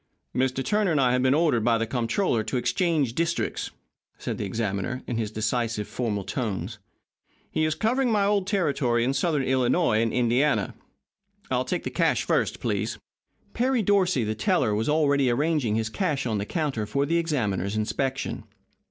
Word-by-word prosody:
"Mr. 130 +1 0
Turner 210 -2 +2
and 155 -4 +2
I 125 -2 +3
have 125 0 +2
been 130 +1 +3
ordered 150 -8 +2
by 115 0 +3
the 115 - 0
Comptroller 120 - 0
to 125 - -1
exchange 155 -2 +1
districts," 170 +4 -1 0.5
said - - -4
the - - -2
examiner, 105 +4 -2
in 120 - -3
his 110 -2 -1
decisive, 110 0 -1
formal 105 -5 -2
tones. 105 -2 -3 0.7
"He 155 - +1
is 155 0 0
covering 250 +6 +1
my 205 -2 +3
old 200 -2 +1
territory 140 - +1
in 130 +3 +1
Southern 150 0 +1
Illinois 130 -1 +2
and 115 -1 +1
Indiana. 125 -2 +1 0.8
I 130 - +2
will 130 - 0
take 180 - -2
the - - -4
cash - - +1
first, - - 0
please." - - -2 0.6
Perry 250 -1 +1
Dorsey, 185 - +2
the 110 0 -1
teller, 105 0 +1
was 110 +6 0
already 140 -3 +3
arranging 140 -3 +1
his 110 0 -1
cash 145 - -1
on 110 -4 -1
the 100 - -4
counter 140 - -2
for 140 +7 0
the 165 +4 +1
examiner's 110 - -1
inspection. 130 +5 -2
130 Hz, 175 wpm, -26 LUFS, 115-160 Hz, 0.8 s, I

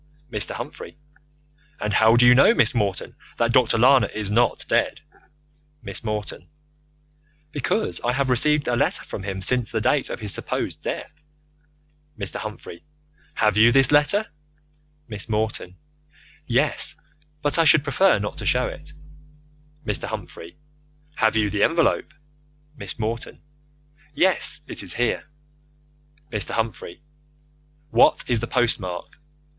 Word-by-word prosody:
Mr. 105 - 0
Humphrey: - - -8 0.8
And 105 0 -2
how 110 +2 +5
do 120 +1 +5
you 125 - +8
know, 140 - +5
Miss - - +3
Morton, 100 -5 -2 0.2
that 115 0 +1
Dr. 120 -2 +3
Lana 130 +3 +5
is 105 -2 -5
not 120 +1 +1
dead? - - 0 0.8
Miss 100 -3 -3
Morton: 105 -1 -5 1.0
Because 125 - -2
I 120 - +1
have 135 +1 0
received 150 +4 +2
a 120 - +1
letter - - 0
from - - -7
him 95 -1 -4
since 125 0 +1
the 115 - -1
date 130 +5 +1
of - - -5
his 105 -3 +2
supposed - - -3
death. 145 - -6 1.0
Mr. 100 -3 -4
Humphrey: 85 - -8 0.5
Have 105 -1 +1
you 115 +2 +6
this 135 0 +4
letter? 150 +9 +4 0.8
Miss 105 0 -5
Morton: 105 -4 -3 0.7
Yes, - - 0 0.5
but 145 +3 +1
I - - +5
should 150 -1 +6
prefer 165 +7 +3
not 105 0 -5
to - - -6
show 125 0 +2
it. 150 +1 -8 0.9
Mr. 105 -5 -1
Humphrey: 85 - -8 0.6
Have 110 0 +2
you 105 -2 +1
the 105 - -2
envelope? 165 -2 +1 0.6
Miss 100 -8 -7
Morton: 115 +1 -4 0.8
Yes, 185 -4 +1
it - - -5
is - - -3
here. 120 0 -1 1.1
Mr. 105 -3 -3
Humphrey: 110 -2 -4 0.9
What - - +4
is 120 -2 +1
the 120 - -4
post 120 -1 +1
mark? 90 +4 -7
115 Hz, 140 wpm, -23 LUFS, 105-135 Hz, 1.1 s, you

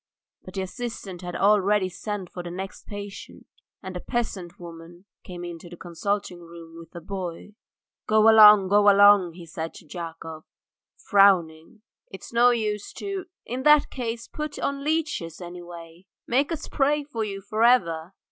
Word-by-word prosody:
But 185 - -12
the 190 - -2
assistant 195 -3 -7
had 175 -1 -6
already 205 -1 +3
sent 190 +1 -6
for 180 - -6
the 175 - -7
next 190 +2 -8
patient, 205 -1 -9 0.4
and 190 -1 -7
a - - -3
peasant 200 -6 -4
woman 170 +1 -12 0.2
came 175 -1 -9
into 175 0 -8
the 175 - -11
consulting 180 +2 -3
room 165 -1 -12
with 165 +1 -15
a - - -5
boy. 190 0 -6 0.5
"Go 215 0 +4
along! 210 -3 +8
go 205 +1 +5
along," 200 -3 +6
he 175 0 -11
said 160 0 -6
to - - -13
Yakov, 165 0 -8 0.5
frowning. 195 -1 +2 0.3
"It's 190 - -11
no 240 +1 +5
use 215 -4 -2
to 390 -2 -5
" - - -67
"In 250 +2 -4
that 300 +1 +5
case 235 -2 -5
put 300 -1 -6
on 280 0 -3
leeches, 295 - -2
anyway! 175 0 -11 0.2
Make 275 +6 +1
us 320 -2 -4
pray 295 +1 +1
for 240 -6 -4
you 200 -2 -5
for 215 +3 -2
ever." 180 -7 +2
195 Hz, 165 wpm, -25 LUFS, 175-225 Hz, 0.5 s, along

